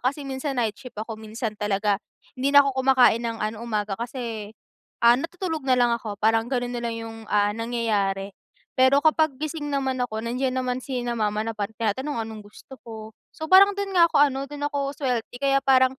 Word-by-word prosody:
kasi 280 Hz, +3 st, -1 dB
minsan 270 Hz, 0 st, -4 dB
nightshift 225 Hz, 0 st, -3 dB
ako. 220 Hz, +1 st, -5 dB
Minsan 220 Hz, +1 st, -4 dB
talaga 205 Hz, 0 st, 0 dB, 0.4 s
hindi 260 Hz, +2 st, 0 dB
na 285 Hz, -, +9 dB
ako 270 Hz, -1 st, -2 dB
kumakain 255 Hz, -3 st, +5 dB
ng 230 Hz, -1 st, -2 dB
ano 215 Hz, +1 st, -4 dB
umaga. 210 Hz, -4 st, -2 dB
Kasi, 235 Hz, -4 st, -5 dB, 0.6 s
ah, 235 Hz, -, +9 dB
natutulog 330 Hz, +1 st, -4 dB
na 255 Hz, -1 st, +3 dB
lang 240 Hz, -1 st, +3 dB
ako 220 Hz, -3 st, -3 dB
parang 225 Hz, +2 st, +2 dB
ganun 245 Hz, -2 st, -2 dB
nalang 235 Hz, -1 st, -3 dB
yung, 225 Hz, 0 st, -7 dB
ah, 205 Hz, 0 st, +2 dB
nangyayari. 210 Hz, -4 st, -1 dB, 0.5 s
Pero 265 Hz, +2 st, +5 dB
kapag 315 Hz, -2 st, +3 dB
gising 310 Hz, -1 st, -3 dB
naman 265 Hz, -2 st, -1 dB
ako 220 Hz, -3 st, -2 dB
nandiyan 255 Hz, +3 st, -1 dB
naman 255 Hz, -1 st, -1 dB
sina 245 Hz, -3 st, -3 dB
mama 210 Hz, 0 st, 0 dB
na 225 Hz, -, -3 dB
pag 205 Hz, -1 st, -1 dB
tinatanong 245 Hz, +7 st, -2 dB
anong 220 Hz, -2 st, -9 dB
gusto 255 Hz, +5 st, -14 dB
ko. 220 Hz, -1 st, -8 dB, 0.2 s
So 315 Hz, 0 st, -7 dB
parang 395 Hz, +2 st, +8 dB
dun 400 Hz, 0 st, -3 dB
nga 340 Hz, -1 st, +7 dB
ako -, -, -2 dB
ano 275 Hz, -1 st, +1 dB
do'n 290 Hz, +1 st, -4 dB
ako 280 Hz, 0 st, -2 dB
swerte. 250 Hz, -5 st, -2 dB
Kaya 275 Hz, 0 st, +3 dB
parang, 260 Hz, 0 st, +4 dB
245 Hz, 190 wpm, -24 LUFS, 220-275 Hz, 0.6 s, na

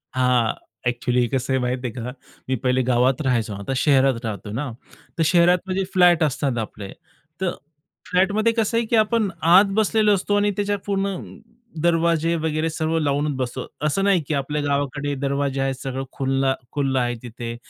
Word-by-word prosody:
हां. 125 Hz, -3 st, +2 dB, 0.3 s
एक्चुअली 120 Hz, 0 st, +1 dB
कसं 130 Hz, 0 st, -1 dB
आहे 130 Hz, -, +2 dB
माहिती 125 Hz, 0 st, -2 dB
आहे 115 Hz, -, -7 dB
का? 125 Hz, +1 st, -5 dB, 0.4 s
मी 130 Hz, -, +2 dB
पहिले 130 Hz, 0 st, +2 dB
गावात 125 Hz, +3 st, +2 dB
राहायचो. 115 Hz, -5 st, 0 dB
आता 100 Hz, +7 st, -4 dB
शहरात 135 Hz, -3 st, +4 dB
राहतो 105 Hz, -1 st, -5 dB
ना, 135 Hz, +7 st, -3 dB, 0.5 s
तर 165 Hz, -, +2 dB
शहरात 175 Hz, +2 st, +5 dB
म्हणजे 190 Hz, +1 st, -1 dB
फ्लॅट 175 Hz, -3 st, +5 dB
असतात 135 Hz, -3 st, 0 dB
आपले. 105 Hz, -2 st, -6 dB, 0.5 s
तर 180 Hz, -2 st, +1 dB, 0.6 s
फ्लॅटमध्ये 205 Hz, +5 st, +2 dB
कसं 230 Hz, 0 st, 0 dB
आहे 230 Hz, -, +1 dB
की 230 Hz, -, +1 dB
आपण 215 Hz, -1 st, +2 dB, 0.2 s
आत 190 Hz, +3 st, +8 dB
बसलेलो 215 Hz, 0 st, +3 dB
असतो 205 Hz, +2 st, -1 dB
आणि 205 Hz, 0 st, +2 dB
त्याच्या 205 Hz, 0 st, 0 dB
पूर्ण 200 Hz, -1 st, 0 dB, 0.8 s
दरवाजे 170 Hz, -1 st, +2 dB
वगैरे 160 Hz, 0 st, -1 dB
सर्व 160 Hz, +1 st, -1 dB
लावूनच 145 Hz, -1 st, 0 dB
बसतो. 130 Hz, 0 st, -3 dB, 0.2 s
असं 195 Hz, +6 st, 0 dB
नाही 195 Hz, -4 st, +3 dB
की 155 Hz, -, -1 dB
आपल्या 145 Hz, +2 st, -1 dB
गावाकडे 145 Hz, 0 st, -1 dB
दरवाजे 140 Hz, -1 st, -1 dB
आहेत, 135 Hz, -1 st, 0 dB
सगळं 135 Hz, 0 st, -3 dB
खुलं, 135 Hz, 0 st, 0 dB, 0.2 s
खुलं 135 Hz, -3 st, 0 dB
आहे 120 Hz, 0 st, 0 dB
तिथे 120 Hz, 0 st, -6 dB
145 Hz, 170 wpm, -22 LUFS, 130-180 Hz, 0.8 s, आत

